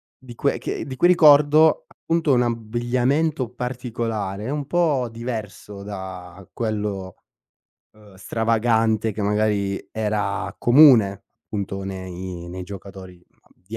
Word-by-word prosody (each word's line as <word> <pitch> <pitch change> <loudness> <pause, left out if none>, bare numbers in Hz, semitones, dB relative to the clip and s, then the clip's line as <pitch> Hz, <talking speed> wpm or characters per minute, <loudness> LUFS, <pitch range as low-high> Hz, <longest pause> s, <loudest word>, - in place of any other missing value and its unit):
di 125 -2 -13
cui 140 - 0
che - - -4
di 130 - -6
cui 175 - +4
ricordo 155 -2 +5
appunto 165 -3 -1
un 125 -1 +3
abbigliamento 120 +5 -1
particolare, 115 -4 -4
un 145 -1 -3
po' 155 -8 +1
diverso 110 -4 -7
da 95 -2 -9
quello, 105 -4 -3 0.8
uhm, 105 -2 -18
stravagante 110 +1 +1
che 105 0 -5
magari 100 -1 0
era 105 -3 -2
comune 120 -7 +5 0.2
appunto 100 -2 -4
nei 95 -2 -7
nei 90 +1 -7
giocatori 95 -1 -10 0.4
di 105 +5 -10
110 Hz, 115 wpm, -22 LUFS, 100-125 Hz, 0.8 s, ricordo